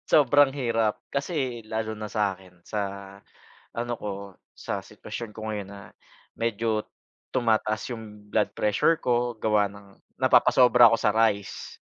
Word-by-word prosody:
Sobrang 145 -1 +5
hirap 115 -5 0 0.2
kasi 140 -5 -2
lalo 110 0 -2
na 105 0 -6
sakin 95 -4 -3
sa 105 - -3 1.0
ano 120 +1 -3
ko 105 - -4 0.4
sa - - -4
sitwasyon 115 -2 -8
ko 110 0 -5
ngayon, 105 -2 -4
na 100 0 -10 0.6
medyo 115 -1 -1 0.5
tumataas 110 -2 +1
yung 105 -3 -9
blood 105 0 +1
prressure 105 +10 +2
ko 120 0 +1
gawa 105 -2 +2
ng 100 -1 -13 0.2
napapasobra 125 -1 +6
ako 115 0 +5
sa - - +3
rice. 105 -2 0
110 Hz, 130 wpm, -26 LUFS, 105-120 Hz, 1.0 s, napapasobra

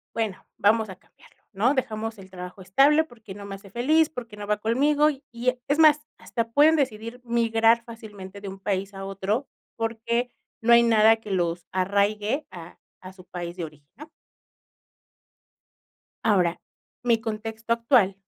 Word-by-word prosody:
bueno, 220 -4 -3
vamos 220 +1 +3
a 185 - -7
cambiarlo, - - -25
¿no? 225 +7 +2
Dejamos 225 -4 -3
el 190 0 -12
trabajo 180 +1 -9
estable 275 - +4
porque 225 -9 -12
no 205 - -9
me 200 0 -6
hace 195 0 -14
feliz, 305 - +2
porque 235 -7 -8
no 205 0 -7
va 210 0 0
conmigo, 290 +7 +3
y 280 -1 -7
y 245 +1 0
e 250 0 -4
es 285 - +1
más, 310 -2 +6 0.2
hasta 230 -1 -3
pueden 310 +5 +5
decidir 230 -3 -2
migrar 230 0 +3
fácilmente 205 -4 -10
de 200 - -8
un 195 0 -8
país 195 0 -2
a 195 0 -7
otro 195 +7 -2 0.3
porque 230 +1 -1 0.3
no 230 +1 +2
hay 235 0 +8
nada 225 -1 +5
que 215 -2 -9
los 175 -2 -1
arraigue 205 +7 0
a 175 -2 -11 0.2
a 185 - -10
su 185 -1 -16
país 175 -1 -6
de 170 - -3
origen, 150 -2 -15
¿no? 305 +2 -11 2.2
Ahora, 180 -5 +2 0.4
mi 235 -2 +2
contexto 225 +1 -5
actual, 230 -5 +3
220 Hz, 165 wpm, -25 LUFS, 195-240 Hz, 2.2 s, hay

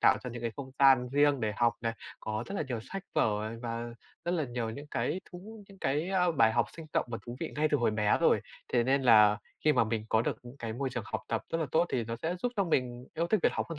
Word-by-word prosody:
tạo - - +6
cho 125 - -4
những 120 0 -7
cái 115 - -1
không 135 -2 -7
gian 135 -3 +6
riêng 145 0 +3
để 110 -1 0
học 120 -1 +3
này, 115 0 -1 0.3
có 110 +2 -3
rất 195 - -6
là 195 - 0
nhiều 120 -3 -2
sách 195 +7 -6
vở, 105 -1 +2
à, 110 - -5
và 115 0 -3 0.4
rất 175 - 0
là 160 -4 0
nhiều 120 -2 -3
những 140 +6 -8
cái 185 - -1
thú 205 +4 -10
những 195 -1 -15
cái, 155 +6 0
a, 180 -2 +3
bài 115 -8 +4
học 120 -1 +2
sinh 160 -1 -8
động - - +1
và 115 - -3
thú 120 +1 -6
vị - - -3
ngay 155 +1 +2
từ 145 - +4
hồi 120 -3 +2
bé 105 -1 +2
rồi. - - +4 0.3
Thế 120 - +4
nên 135 +2 +2
là 105 -4 +6 0.3
khi 155 - +6
mà 120 -4 +3
mình 110 -1 -2
có 110 +1 +3
được - - -1
những 120 +2 -11
cái 115 -4 -4
môi 135 +2 -2
trường - - -4
học - - -3
tập - - -1
rất 165 - +1
là 160 - 0
tốt, 170 +2 +4
thì 120 -3 -1
nó 115 +1 -4
sẽ 170 +3 -1
giúp 245 - 0
cho 200 - +2
mình 125 -6 -1
yêu 170 +1 0
thích 215 0 +2
việc - - +4
học - - -2
hơn 165 - -5
125 Hz, 290 wpm, -30 LUFS, 115-160 Hz, 0.4 s, tạo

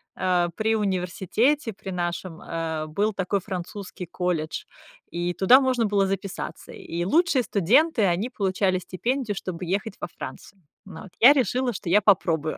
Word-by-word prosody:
а, 180 -2 +1
при 220 +1 +1
университете, 210 - 0
при 195 - -9
нашем, 175 -1 -4
э, 160 -2 -3
был 205 +7 0
такой 195 +1 -1
французский 185 0 -6
колледж, 170 -3 -3 0.4
и 175 +1 -2
туда 220 +9 +6
можно 255 -4 +1
было 200 -1 +2
записаться. 195 0 -5
И 170 +1 -5
лучшие 300 - +3
студенты, 230 - +3
они 190 +6 +1
получали 190 -4 0
стипендию, 225 +5 -2
чтобы 185 -2 -5
ехать 195 +5 -2
во - - -3
Францию. 195 -1 -10 0.2
Вот, 190 0 -10
я 255 +5 +9
решила, 255 -2 0
что 175 - -6
я 205 +4 +5
попробую. 165 -6 +2
195 Hz, 150 wpm, -25 LUFS, 175-220 Hz, 0.4 s, я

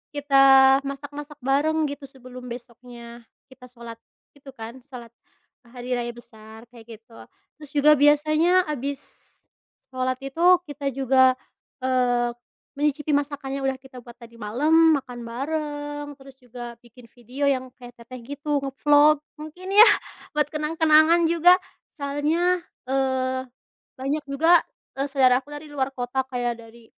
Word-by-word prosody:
kita 270 -1 +5
masak-masak 290 +1 -8
bareng 305 +4 +1
gitu 285 -1 -9
sebelum 255 -1 -12
besoknya 235 -1 -11 0.2
kita 250 -1 -15
sholat 235 -2 -12 0.3
itu 285 -1 -24
kan, 230 +2 -9
sholat 245 -3 -12 0.6
hari 245 +1 -9
raya 240 -1 -2
besar 220 -1 -14
kayak 230 -1 -13
gitu. 225 +1 -18 0.4
Terus 295 -2 -13
juga 295 +1 +5
biasanya 310 +5 +3
abis 280 0 -4 0.9
sholat 255 0 -1
itu 350 +6 +3
kita 290 -2 -6
juga, 260 -1 +4 0.5
eee, 245 -2 +1 0.5
menyicipi 295 +1 -1
masakan 285 -1 -2
yang 270 - -4
udah 270 - +1
kita 265 -1 -15
buat 240 - -12
tadi 235 0 -14
malam, 305 +9 +3
makan 245 -2 -11
bareng 290 +3 -5
terus 270 -1 -16
juga 240 -2 -10
bikin 235 0 -19
video 255 +4 -3
yang 260 -2 -2
kayak 245 -1 -14
teteh 235 +1 -11
gitu, 285 +3 -3
nge-vlog 290 +2 +3 0.2
mungkin 330 +5 -9
ya 430 +3 +9 0.5
buat 300 - +3
kenang-kenangan 315 +2 +3
juga 340 +2 +5 0.3
soalnya, 315 +5 -1 0.2
eee, 260 0 -1 0.6
banyak 275 +4 -2
juga, 325 +5 +4 0.3
eee, 275 +1 -3
saudaraku 260 0 +2
dari 295 +1 -9
luar 270 -1 -1
kota 260 0 -3
kayak 240 -2 -3
dari, 230 +1 -17
270 Hz, 135 wpm, -23 LUFS, 245-295 Hz, 0.9 s, ya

